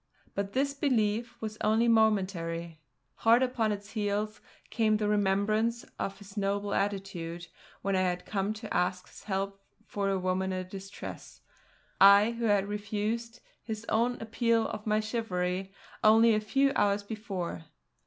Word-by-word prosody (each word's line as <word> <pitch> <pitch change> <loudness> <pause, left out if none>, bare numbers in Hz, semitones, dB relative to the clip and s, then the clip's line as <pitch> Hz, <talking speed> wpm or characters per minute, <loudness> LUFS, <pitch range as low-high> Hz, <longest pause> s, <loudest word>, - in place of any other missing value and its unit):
But 200 0 -3
this 280 +1 +1
belief 235 -4 0
was 215 -1 -5
only 220 +2 +3
momentary. 185 -7 +1 0.4
Hard 230 +3 +5
upon 235 -4 0
its 205 +1 -5
heels 210 0 -2 0.3
came 215 -1 +2
the 210 -1 -1
remembrance 210 +3 +1
of 195 - -3
his 200 -1 -13
noble 200 0 -1
attitude 190 -4 -2 0.4
when 195 -1 +1
I 185 - +2
had 180 -1 -1
come 200 0 -1
to 215 -1 -7
ask 180 0 0
his - - -15
help 195 0 -2 0.2
for 200 -1 -2
a 195 - +1
woman 185 +1 -1
in 185 0 -4
distress 195 +1 -9 0.6
I 200 +3 +8
who 235 0 -3
had 205 -2 +3
refused 215 +3 -3 0.2
his 220 -1 -6
own 235 +3 +1
appeal 230 0 +1
to 215 - -5
my 215 0 +2
chivalry 190 -4 -2 0.3
only 225 +1 +6
a 215 - +3
few 270 +6 +2
hours 200 0 +2
before. 195 - -5
205 Hz, 150 wpm, -30 LUFS, 195-225 Hz, 0.6 s, I